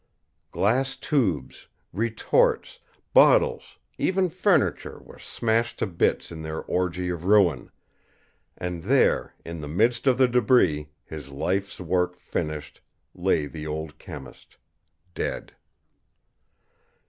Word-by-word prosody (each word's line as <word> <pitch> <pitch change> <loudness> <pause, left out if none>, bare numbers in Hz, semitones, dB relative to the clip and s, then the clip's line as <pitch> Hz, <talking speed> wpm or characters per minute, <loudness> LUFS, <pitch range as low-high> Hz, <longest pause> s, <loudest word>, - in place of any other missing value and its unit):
Glass 130 +6 +1
tubes, 95 - -1 0.3
retorts, 115 - +1 0.3
bottles, 485 -1 +4 0.2
even 185 -1 +1
furniture 180 - +1
were - - -15
smashed 115 +1 -1
to - - 0
bits 85 -3 0
in 80 -1 -7
their 80 0 -5
orgy 90 0 -1
of 85 -2 -4
ruin 100 -3 +3 0.9
and 90 -1 -4
there, - - +2
in 85 -1 -6
the 75 - -6
midst 115 - +1
of 130 -2 +4
the 130 -1 +5
debris, 105 - +3 0.2
his 75 -3 -9
life's 95 +8 -2
work 90 0 0
finished, 75 -2 -5 0.3
lay 75 - +1
the 75 +1 -7
old 75 0 -5
chemist, 75 -8 -11 0.6
dead. - - -4
90 Hz, 110 wpm, -25 LUFS, 80-120 Hz, 0.9 s, the